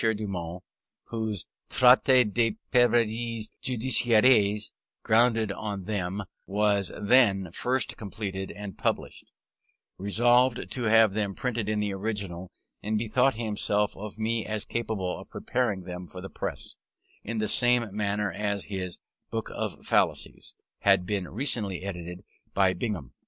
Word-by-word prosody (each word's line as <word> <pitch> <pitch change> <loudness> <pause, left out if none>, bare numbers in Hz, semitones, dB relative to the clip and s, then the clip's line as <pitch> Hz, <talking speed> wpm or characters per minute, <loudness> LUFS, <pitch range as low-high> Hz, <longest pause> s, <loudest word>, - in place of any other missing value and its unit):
Dumont 95 -6 -2 0.5
(whose 110 -4 -3 0.2
Traité 125 0 +6
des 115 -2 +2 0.2
Preuves 115 -2 +2
Judiciaires, 115 -4 +3 0.3
grounded 115 -1 +3
on 100 -1 -4
them, 100 0 -2 0.2
was 100 -1 +1
then 100 -5 +4
first 125 +5 -1
completed 100 -2 -5
and 100 -2 -8
published), - - -2 0.7
resolved 120 +5 +2
to 125 - -3
have 110 -2 +5
them 100 -2 -1
printed 120 -5 -2
in 105 0 0
the 105 -1 -1
original, 95 -3 -4 0.3
and 110 +1 -1
bethought 120 +4 +2
himself 105 -2 0
of 105 +1 -8
me 110 0 0
as 105 -1 -3
capable 110 -6 -2
of - - -12
preparing 105 -7 -1
them 90 0 -7
for 90 - -9
the 95 +1 -8
press; - - -5 0.5
in 115 +2 -4
the 110 0 0
same 120 -4 +3
manner 105 -1 0
as 100 -2 -2
his 90 -2 -3 0.3
Book - - -4
of - - -4
Fallacies - - 0 0.2
had 100 -2 +4
been 95 -2 -2
recently 105 -6 -2
edited 90 -2 -6 0.3
by 95 -1 +4
Bingham. 95 - -4
105 Hz, 130 wpm, -27 LUFS, 95-115 Hz, 0.7 s, Traité